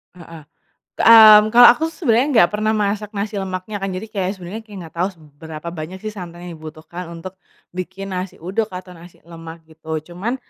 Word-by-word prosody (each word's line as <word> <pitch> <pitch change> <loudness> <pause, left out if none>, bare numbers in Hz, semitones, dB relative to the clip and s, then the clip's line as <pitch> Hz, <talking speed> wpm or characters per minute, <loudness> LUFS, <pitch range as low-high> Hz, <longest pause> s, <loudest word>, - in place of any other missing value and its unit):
Heeh, 165 -2 -12 0.5
k - - -13
mmm, 215 -2 +8
kalau 240 +2 +8
aku 315 - -3
sebenarnya 265 -6 +1
nggak 220 -10 +4
pernah 215 +1 0
masak 210 -1 -1
nasi 210 0 -4
lemaknya 190 +2 -6
kan 195 - -2
jadi 185 +4 -6
kayak 190 -3 -2
sebenarnya 185 +5 -8
kayak 210 -3 -12
nggak 160 - -17
tau 175 +3 0
seberapa 155 -1 -11
banyak 165 +3 -7
sih 215 +2 -6
santan 175 -2 -9
yang 175 - -8
dibutuhkan 160 +2 -10
untuk, 170 +2 -9 0.4
bikin 190 +2 -6
nasi 185 0 -5
uduk 200 +6 -3
atau 180 0 -9
nasi 170 +1 -16
lemak 165 -1 -11
gitu 160 +1 -7
cuman, 220 +9 -3
185 Hz, 190 wpm, -19 LUFS, 170-210 Hz, 0.5 s, mmm